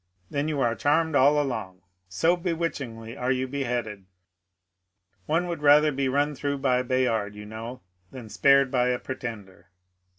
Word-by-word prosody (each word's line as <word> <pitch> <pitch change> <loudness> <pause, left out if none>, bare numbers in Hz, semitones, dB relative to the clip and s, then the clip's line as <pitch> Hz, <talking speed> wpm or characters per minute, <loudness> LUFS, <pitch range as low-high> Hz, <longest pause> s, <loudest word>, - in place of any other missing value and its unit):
Then 145 +1 -1
you 150 -2 -2
are 120 -2 +2
charmed 160 +5 +1
all 145 +2 +5
along 95 -10 -4
— 90 0 -48
so 170 +2 +4
be 175 -1 -2
witchingly 120 -9 -5
are 125 0 -1
you 130 0 -1
beheaded: 120 -7 -3 1.2
one 165 +3 +1
had 170 -3 -4
rather 150 +1 +6
be 135 -1 -1
run 145 +3 +1
through 140 +1 -3
by 130 -2 +1
Bayard, 120 -5 0
you 105 0 -9
know, 110 +3 -8 0.3
than 125 -4 -10
spared 140 +3 +4
by 125 -2 +2
a 125 0 +1
pretender. 105 -9 -8
130 Hz, 165 wpm, -26 LUFS, 115-145 Hz, 1.2 s, rather